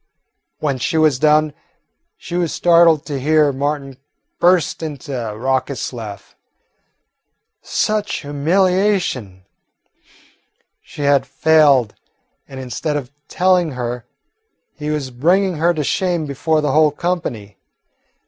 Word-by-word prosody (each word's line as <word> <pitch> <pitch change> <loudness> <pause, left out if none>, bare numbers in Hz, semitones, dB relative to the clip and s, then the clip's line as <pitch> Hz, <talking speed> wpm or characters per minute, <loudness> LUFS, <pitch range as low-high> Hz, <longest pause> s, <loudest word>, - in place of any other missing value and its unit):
When 140 -4 -2
she 160 +6 -1
was 155 -5 +3
done, 155 0 +3 0.6
she - - -10
was 175 -3 0
startled 170 -3 +4
to 145 -3 -4
hear 150 +1 +3
Martin 140 -1 -3 0.4
burst 175 -3 +2
into 145 -2 -6
a 110 -4 -4
raucous 130 +1 -2
laugh. 110 -4 -9 1.3
Such 215 -1 -1
humiliation! 165 - 0 1.4
She 145 - -8
had 140 -1 +2
failed, 145 -8 +3 0.5
and 135 - -9
instead 130 +4 -3
of 135 -3 -7 0.2
telling 180 -4 +2
her, 120 -1 -5 0.7
he 150 0 -6
was 145 -4 -3
bringing 175 +8 +1
her 170 +3 +2
to 155 -3 -2
shame 175 +1 -1
before 150 +3 0
the 150 -2 0
whole 155 +1 +4
company. 145 - -4
150 Hz, 115 wpm, -18 LUFS, 130-165 Hz, 1.4 s, startled